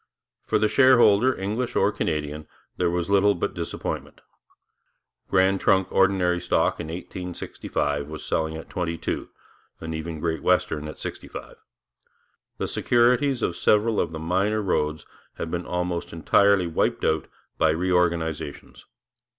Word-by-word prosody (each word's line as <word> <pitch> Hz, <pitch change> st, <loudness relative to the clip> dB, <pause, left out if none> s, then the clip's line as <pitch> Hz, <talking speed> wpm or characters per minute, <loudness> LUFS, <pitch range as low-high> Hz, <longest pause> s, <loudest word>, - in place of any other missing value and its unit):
For -, -, +2 dB
the 110 Hz, -, +3 dB
shareholder, 130 Hz, -2 st, +5 dB
English 110 Hz, +6 st, -2 dB
or 100 Hz, +1 st, +3 dB
Canadian, 75 Hz, -4 st, -3 dB, 0.3 s
there 90 Hz, -1 st, +1 dB
was 85 Hz, 0 st, -1 dB
little 100 Hz, +1 st, +4 dB
but 85 Hz, -, -2 dB
disappointment. -, -, -5 dB, 1.1 s
Grand 95 Hz, +1 st, +3 dB
Trunk 95 Hz, -1 st, +2 dB
ordinary 90 Hz, -2 st, +2 dB
stock 90 Hz, -, +1 dB
in -, -, -5 dB
1865 80 Hz, -4 st, -4 dB
was 80 Hz, 0 st, -8 dB
selling 80 Hz, 0 st, -1 dB
at 80 Hz, -, -9 dB
22, 85 Hz, -3 st, -3 dB, 0.5 s
and 80 Hz, 0 st, -5 dB
even 80 Hz, 0 st, -5 dB
Great 80 Hz, -1 st, -2 dB
Western 75 Hz, -1 st, +1 dB
at 75 Hz, -, -8 dB
65. -, -, -8 dB, 1.0 s
The -, -, -2 dB
securities 125 Hz, +2 st, +2 dB
of 85 Hz, -, 0 dB
several 105 Hz, +3 st, +2 dB
of 85 Hz, -, 0 dB
the 80 Hz, -, -5 dB
minor 95 Hz, +6 st, 0 dB
roads 75 Hz, -5 st, -1 dB, 0.3 s
had 80 Hz, -, -5 dB
been 85 Hz, 0 st, -3 dB
almost 90 Hz, -1 st, -2 dB
entirely 95 Hz, +4 st, +3 dB
wiped 85 Hz, -, 0 dB
out -, -, +1 dB, 0.3 s
by 80 Hz, -, +4 dB
reorganizations. 85 Hz, -3 st, -1 dB
90 Hz, 135 wpm, -25 LUFS, 80-100 Hz, 1.1 s, shareholder